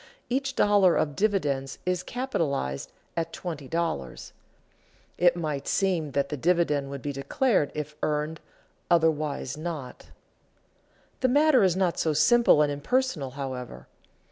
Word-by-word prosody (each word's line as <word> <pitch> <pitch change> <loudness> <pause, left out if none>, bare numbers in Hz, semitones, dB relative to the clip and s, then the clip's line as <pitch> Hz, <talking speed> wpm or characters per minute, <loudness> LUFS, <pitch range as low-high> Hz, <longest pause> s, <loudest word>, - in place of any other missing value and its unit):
each 270 +1 -1
dollar 200 -4 +4
of 145 -2 0
dividends 145 -11 0
is 180 -1 0
capitalized 150 - -2 0.2
at 165 -1 -2
$20. 165 0 -4 0.9
It 175 -1 +5
might 155 -5 -3
seem 175 -7 0
that 140 0 0
the 150 - -3
dividend 150 -3 +1
would 140 -2 -7
be 145 - -3
declared 145 - +1
if 150 0 -5
earned, 150 +2 -1 0.5
otherwise 155 -5 +1
not. 155 -6 -6 1.1
The 260 - +2
matter 290 +1 +4
is 185 -3 +3
not 185 -3 0
so 160 - +1
simple 155 0 +5
and 145 - 0
impersonal, 155 - -1
however. 125 - -6
160 Hz, 125 wpm, -27 LUFS, 140-185 Hz, 1.1 s, It